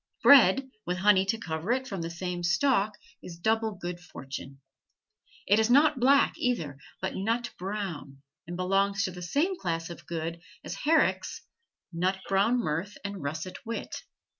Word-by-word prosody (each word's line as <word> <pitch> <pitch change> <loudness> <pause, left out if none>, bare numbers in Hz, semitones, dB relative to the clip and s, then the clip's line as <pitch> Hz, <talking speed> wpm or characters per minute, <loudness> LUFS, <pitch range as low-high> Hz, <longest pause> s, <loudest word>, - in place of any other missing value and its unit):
Bread 265 0 +7
with 180 +1 -2
honey 190 0 +4
to 225 +3 +1
cover 165 0 -3
it 260 +1 0
from 195 -7 -4
the 165 - -3
same 175 +1 -4
stalk 205 +3 +2 0.2
is 170 -2 -9
double 220 +4 +1
good 175 -1 -5
fortune. 135 -5 -9 0.9
It 205 +3 +4
is 220 +1 +2
not 285 +2 +5
black, 275 +3 +5
either, 160 - -1 0.2
but 190 - -1
nut 230 +5 -1
brown, 180 -8 -5 0.2
and 175 +1 -5
belongs 195 +2 +1
to 185 - -1
the 180 0 -9
same 290 - 0
class 165 -1 -2
of 170 - -11
goods 165 0 -4 0.2
as - - -5
Herrick's 320 +2 +1 0.5
"Nut 185 +3 0
brown 200 +5 +3
mirth 190 -1 -2
and 200 -1 -4
russet 155 +5 -5
wit." 230 0 -5
190 Hz, 160 wpm, -28 LUFS, 170-225 Hz, 0.9 s, Bread